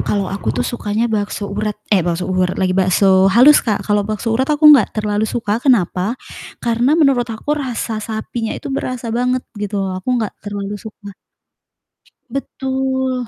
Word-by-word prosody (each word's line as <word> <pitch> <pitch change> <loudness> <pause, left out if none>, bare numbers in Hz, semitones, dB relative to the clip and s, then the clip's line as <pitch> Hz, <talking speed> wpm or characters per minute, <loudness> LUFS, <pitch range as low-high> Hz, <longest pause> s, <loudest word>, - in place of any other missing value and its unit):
kalau 200 -2 -1
aku 190 - -4
tuh 125 - 0
sukanya 220 -1 -2
bakso 205 -1 -2
urat 210 0 -2 0.2
eh 200 - +5
bakso 175 +1 -2
urat 185 -1 0
lagi, 185 -1 +1
bakso 190 0 +4
halus 255 +9 +7
Kak, 215 -4 -2
kalau 205 -1 +2
bakso 215 +2 -2
urat 265 +5 0
aku 300 +1 0
enggak 250 -8 +5
terlalu 210 0 0
suka, 225 -1 -2
kenapa? 225 - +1 0.4
Karena 240 +5 +1
menurut 275 -6 +3
aku 230 +6 -3
rasa 245 -6 -3
sapinya 220 +1 -4
itu 275 - -6
berasa 250 -3 -3
banget 250 +2 0 0.2
gitu 205 0 -3
loh 190 - -3
aku - - -10
enggak 220 -3 -2
terlalu 205 0 -5
suka. 205 -2 -11 1.2
Betul, 260 -2 -2
220 Hz, 165 wpm, -18 LUFS, 200-250 Hz, 1.2 s, halus